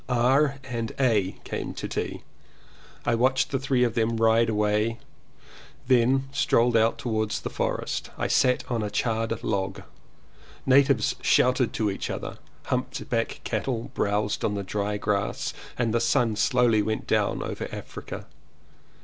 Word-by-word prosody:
R. 135 +4 +3
and 115 -4 -4
A. 110 -8 +2
came - - -5
to - - -4
tea. - - -4 0.8
I 120 - +2
watched 130 +3 +2
the 135 - 0
three 135 -2 +1
of 120 -2 +1
them 115 0 +1
ride 115 +1 +4
away, 105 +1 +1 0.9
then 130 +1 +3
strolled 120 -4 +2
out 115 0 +3
towards 110 -3 -1
the - - -5
forest. - - -2
I - - -1
sat 125 -1 +3
on 120 -3 -1
a 105 - -2
charred 115 0 -1
log. 95 -1 -2 0.8
Natives 135 -3 +4
shouted 125 -1 +3
to 105 -2 0
each 95 - -4
other, - - -5 0.2
humped 130 +1 -3
backed 115 -1 -1
cattle 115 +1 -2
browsed 105 +1 0
on 105 - 0
the 100 - -3
dry 105 +2 -2
grass 100 -1 -1 0.2
and 115 -3 0
the 115 - +2
sun 115 -2 +2
slowly 120 -2 +3
went 110 +1 -2
down - - +1
over - - -4
Africa. - - -7
115 Hz, 150 wpm, -26 LUFS, 110-125 Hz, 0.9 s, ride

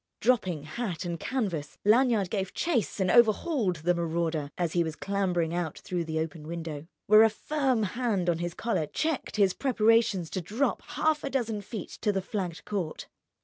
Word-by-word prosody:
Dropping 200 - +1
hat 180 +1 -4
and 170 -1 -3
canvas, 180 - -3
Lanyard 220 -3 +4
gave 195 -3 -2
chase 275 -12 0
and 185 -2 +2
overhauled 235 - +3
the 170 +3 +1
marauder 165 -3 -1
as 170 -3 -1
he 175 - +3
was 160 -1 -4
clambering 180 -5 -1
out 175 -3 -2
through 175 -2 -3
the 160 0 -3
open 160 -1 -4
window, 160 -2 -5 0.2
where 215 +1 +7
a 225 - +7
firm 260 0 0
hand 210 -4 -1
on 170 -2 +1
his 175 0 -3
collar 220 -10 -1
checked 315 - -2
his 200 -3 +3
preparations 225 - +2
to 185 - -2
drop 220 - -1 0.2
half 310 -1 +2
a 280 - -2
dozen 230 -6 -1
feet 205 -1 -7
to 210 - +2
the 195 -2 -2
flagged 185 -5 -4
court. 190 -7 -4
195 Hz, 180 wpm, -28 LUFS, 170-230 Hz, 0.2 s, where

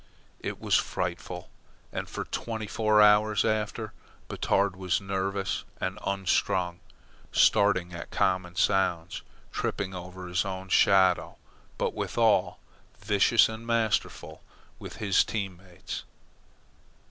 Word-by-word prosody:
It - - -5
was - - -3
frightful, 90 0 -4 0.4
and - - -4
for - - -5
twenty 110 -2 -4
four 110 0 +3
hours 105 0 +4
after, 110 0 -2 0.4
Batard 100 -1 +1
was 95 -2 0
nervous 95 0 -2 0.2
and - - -3
unstrung, 90 -2 0 0.5
starting 95 -4 +3
at 85 - -7
common 90 -2 0
sounds, 90 -3 +1 0.3
tripping 95 -1 -3
over 90 0 -8
his 90 +1 0
own 95 -1 -6
shadow, 95 -1 +4 0.4
but, - - -1
withal, 105 -6 +1 0.4
vicious 105 +2 +4
and 110 +1 -8
masterful 115 -2 -1 0.4
with - - -9
his 100 -3 +3
team 100 -5 -4
mates. 90 -1 -8
95 Hz, 110 wpm, -28 LUFS, 90-105 Hz, 0.5 s, hours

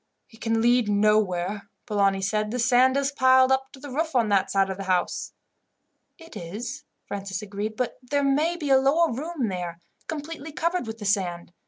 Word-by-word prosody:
"It 225 - -18
can 225 -1 +1
lead 240 -2 +3
nowhere," 205 -2 +1 0.2
Polani 195 -2 +1
said. 210 +2 0
"The 245 - -3
sand 255 +2 +4
is 280 0 0
piled 260 -1 +5
up 265 0 +1
to 270 - -12
the 285 0 -9
roof 315 +2 -2
on 230 -4 +3
that 195 -1 +2
side 195 -1 +2
of 190 - -5
the 195 - -6
house." 185 -1 -1 0.9
"It 330 0 -14
is," 225 - -6 0.2
Francis 195 -1 -5
agreed; 210 +1 -4
"but 250 - -2
there 285 +3 -1
may 300 +5 +2
be 295 -5 -2
a 265 - +7
lower 295 +3 +3
room 290 0 -3
there, 175 -3 -4 0.3
completely 315 0 -6
covered 335 -4 -1
with 220 0 -6
the 210 - -8
sand. 175 -4 -1
230 Hz, 190 wpm, -25 LUFS, 200-275 Hz, 0.9 s, a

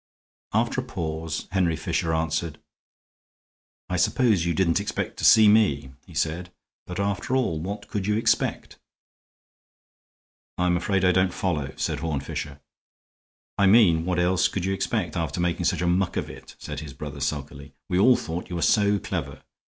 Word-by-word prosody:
After - - +1
a - - -9
pause 80 0 -4
Henry 90 -4 +1
Fisher 80 +2 -1
answered: 80 0 -1 1.3
"I 90 - -2
suppose 100 -2 +2
you 85 - 0
didn't 85 0 +2
expect 100 - -4
to - - -7
see 110 -1 +7
me," 85 -11 +3 0.2
he 85 - -14
said. 85 +3 -2 0.4
"But, 90 +1 -5
after 100 +5 -1
all, 120 -12 0
what 100 +6 -5
could 100 -2 -3
you 105 - +2
expect?"' 115 - 0 1.8
"I'm 90 0 +2
afraid 95 +1 0
I 90 - +5
don't 95 0 +2
follow," 75 -8 -2
said - - -2
Horne 80 -4 -2
Fisher. 70 +1 -6 1.0
"I 100 - +5
mean 95 -6 +5
what 90 0 -1
else 90 +1 +3
could 90 0 -3
you 95 - 0
expect, 95 -4 -2
after 85 0 -2
making 85 0 0
such 85 0 +1
a - - +1
muck 90 +1 +1
of - - -3
it?" - - -13
said 75 -1 -6
his 75 -3 -8
brother, 75 0 -7
sulkily. 70 -1 -4
"We 90 -1 0
all 125 +5 +6
thought 85 -3 -5
you 90 - -4
were 85 - -1
so 105 -1 +3
clever. - - -5
90 Hz, 170 wpm, -25 LUFS, 80-95 Hz, 1.8 s, see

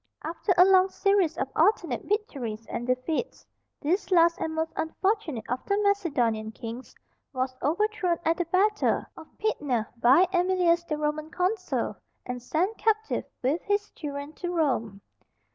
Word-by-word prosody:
After 335 +5 -2
a 360 - +8
long 380 0 +5
series 390 -5 +2
of 270 - -1
alternate 335 - +2
victories 265 - -3
and 240 +2 -5
defeats, 255 - -2 0.4
this 360 +7 0
last 340 -2 +5
and 320 0 -3
most 320 0 -2
unfortunate 325 - -1
of 250 +2 -3
the 400 - +1
Macedonian 255 - +1
kings 230 +3 -8 0.4
was 255 0 -2
overthrown 360 +3 +1
at 325 +1 +2
the 350 - 0
battle 400 +5 +2
of 320 - -11
Pydna 285 - 0
by 260 +10 +6
Æmilius, 355 -1 +2
the 305 - -1
Roman 300 +1 -2
consul, 365 +3 -1 0.3
and 250 -1 -5
sent 360 - -1
captive, 440 0 0 0.2
with 285 +7 +1
his 410 +1 0
children, 285 -1 -6
to 350 +2 -4
Rome. 245 - 0
330 Hz, 145 wpm, -27 LUFS, 265-380 Hz, 0.4 s, a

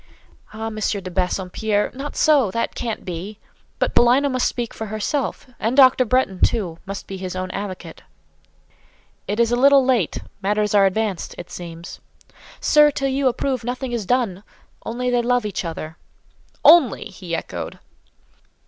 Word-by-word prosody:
"Ah, 220 +1 -6
M. 220 -1 -5
de 200 -3 -2
Bassompierre—not 205 +8 -2
so—that 245 -8 +2
can't 230 -3 -4
be! 185 +4 -6 0.4
But - - 0
Paulina 255 +4 +4
must 255 -1 +1
speak 240 -2 -4
for 220 - -6
herself: 215 +7 -2
and 230 +5 -1
Dr. 260 -1 +6
Bretton, 220 -6 +1
too, 175 -7 +1
must 195 0 -6
be 195 - -7
his 185 -1 -5
own 185 0 -4
advocate." 185 -5 -6 1.3
"It 205 +3 -2
is 235 0 +3
a - - +3
little 275 +1 +5
late. 245 -10 +1 0.2
Matters 210 +1 0
are 200 -1 +6
advanced, 200 -1 -2
it 175 - -9
seems." 170 -1 -8 0.6
"Sir, 300 0 +5
till 275 -1 -2
you 270 0 +1
approve, 255 0 -1
nothing 250 +2 -4
is 230 -5 -3
done—only 240 +2 -3
they 245 -1 +2
love 245 -1 +1
each 205 -2 -3
other." 160 -1 -6 0.7
"Only!" 325 -8 +6
he 185 -5 -5
echoed. - - -6
220 Hz, 150 wpm, -21 LUFS, 190-255 Hz, 1.3 s, Dr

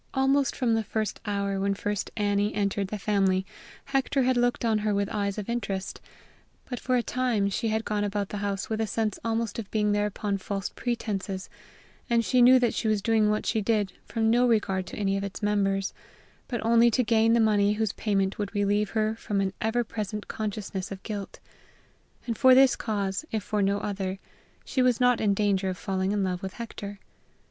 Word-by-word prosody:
Almost 270 0 +2
from 240 -3 +1
the 225 0 +1 0.4
hour 200 -1 -1
when 200 0 0
first 205 0 -2
Annie 205 0 +1
entered 200 -1 0
the 210 - -4
family, 195 -2 +1 0.4
Hector 270 0 +1
had 255 0 +2
looked 245 0 +1
on 220 -2 +2
her 210 -1 0
with 200 0 +1
eyes 200 -1 -1
of 210 - -4
interest; 200 -5 -3 0.7
but, 245 -3 -4
for 255 - 0
a 245 - +2
time, 235 -6 0
she 225 - -1
had 220 0 -1
gone 210 -1 -1
about 205 -1 -2
the 205 - -4
house 200 -1 -2
with 220 0 -2
a 220 - 0
sense 215 -1 -1
almost 230 0 -1
of 210 - -6
being 210 -1 +1
there 205 0 +2
upon 205 -1 -2
false 195 0 -3
pretenses, 200 -5 -3 0.6
for 235 -1 +3
she 250 +2 +3
knew 255 +2 +8
that 245 -2 +2
she 225 - -1
was 215 -2 +1
doing 220 -2 +3
what 210 0 0
she 220 - +1
did 205 -2 0
from 225 -1 0
no 245 +1 +4
regard 195 -5 +1
to - - -8
any 195 -1 0
of 195 - -3
its 200 +2 -6
members, 195 -2 +1 0.5
but 240 -4 -3
only 235 +1 +5
to 250 +2 +2
gain 225 0 +3
the 235 - +4
money 210 -2 +3
whose 215 -1 -1
payment 195 -2 0
would 205 -1 -3
relieve 205 0 +1
her 215 0 +2
from 205 -2 -2
an 195 -1 0
ever 225 +2 +1
present 210 -2 -5
consciousness 205 -3 -4
of 195 -1 -7
guilt; 205 -3 -5 0.9
and 230 -3 -3
for 260 -1 +7
this 265 0 +6
cause, 200 -2 -2
if 220 -3 -2
for 210 +1 -1
no 200 +1 +2
other, 195 -2 -3 0.5
she 260 - 0
was 250 -2 +3
not 250 -1 +3
in 205 -2 +2
danger 195 -2 +1
of 185 - -4
falling 190 0 -1
in 205 -1 0
love 180 -1 -2
with 190 0 -5
Hector. 205 -3 -7
210 Hz, 205 wpm, -27 LUFS, 200-230 Hz, 0.9 s, knew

